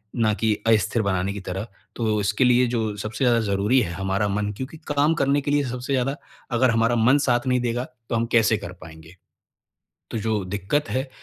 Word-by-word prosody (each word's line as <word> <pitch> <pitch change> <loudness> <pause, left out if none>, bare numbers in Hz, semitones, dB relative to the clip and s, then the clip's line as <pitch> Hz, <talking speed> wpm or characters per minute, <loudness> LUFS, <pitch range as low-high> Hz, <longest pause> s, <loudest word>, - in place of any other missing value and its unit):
ना 110 -3 +2
की 110 +1 +1
अस्थिर 110 +1 +3
बनाने 95 -1 -1
की 100 - -6
तरफ। 95 +4 -5 0.3
तो 110 -2 0
इसके 100 +4 +1
लिए 125 0 +4
जो 110 -2 -1
सबसे 110 +6 -4
ज़्यादा 120 -1 +4
ज़रूरी 100 +6 +2
है 90 -7 -2
हमारा 95 +3 -1
मन। 105 +1 -1
क्योंकि 130 +9 -7
काम 145 +2 +3
करने 140 -1 +1
के 145 - -2
लिए 145 0 +2
सबसे 125 +2 -4
ज़्यादा 135 +1 0 0.4
अगर 130 +2 +4
हमारा 115 +1 +2
मन 120 +4 +4
साथ 120 +1 +1
नहीं 125 0 +2
देगा 120 0 -1 0.3
तो - - 0
हम 115 0 +1
कैसे 110 -1 +4
कर 100 -4 -8
पाएँगे। 80 +2 -13 1.0
तो - - -2
जो 110 -1 -1
दिक्कत 100 +11 -2
है, 130 +1 -2
115 Hz, 205 wpm, -23 LUFS, 100-125 Hz, 1.0 s, लिए